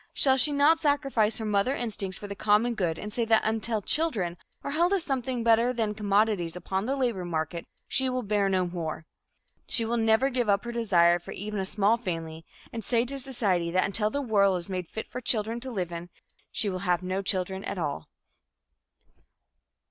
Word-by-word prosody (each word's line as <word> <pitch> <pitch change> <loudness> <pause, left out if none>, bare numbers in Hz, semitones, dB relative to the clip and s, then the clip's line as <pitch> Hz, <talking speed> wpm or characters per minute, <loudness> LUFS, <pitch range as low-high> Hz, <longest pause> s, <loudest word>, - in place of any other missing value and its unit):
Shall 265 -2 +5
she 265 +3 +3
not 290 +3 +4
sacrifice 275 -8 +1
her 220 - -3
mother 210 +6 +1
instincts 210 -6 -3
for 205 - -7
the 200 - -5
common 215 +4 +2
good 175 -7 -1
and 210 0 -6
say 235 - 0
that 225 -1 +4
until 220 -1 -1
children 215 - 0 0.3
are 280 - -3
held 340 +5 +2
as 385 -4 +2
something 255 -4 -2
better 230 +1 +4
than 220 -3 -1
commodities 205 -4 +1
upon 190 +3 -3
the 270 - 0
labor 240 -9 -1
market, 170 0 -3 0.2
she 265 -1 +1
will 255 0 -2
bear 205 -1 +1
no 185 -1 +1
more? 165 -2 -5 0.6
Shall 230 -1 +1
she 235 - +1
not 245 +5 +3
give 245 -4 0
up 200 0 +3
her 240 - -3
desire 175 -7 +3
for 175 - -9
even 210 +1 -4
a 190 - -1
small 210 +3 +2
family, 165 -7 -5 0.3
and 225 -1 -5
say 235 +1 +1
to 275 +2 -5
society 205 -10 0
that 185 +2 +2
until 210 +2 0
the 285 +4 -2
world 200 -5 +3
is 175 +2 -5
made 185 -2 -3
fit 220 - -6
for 250 - -6
children 225 -1 0
to 260 +2 -7
live 180 -6 -3
in, 170 +1 -6 0.4
she 215 - -1
will 185 -2 -2
have 180 -1 0
no 185 +1 -2
children 190 0 -1
at - - -4
all? 145 - -3
210 Hz, 200 wpm, -27 LUFS, 185-240 Hz, 0.6 s, Shall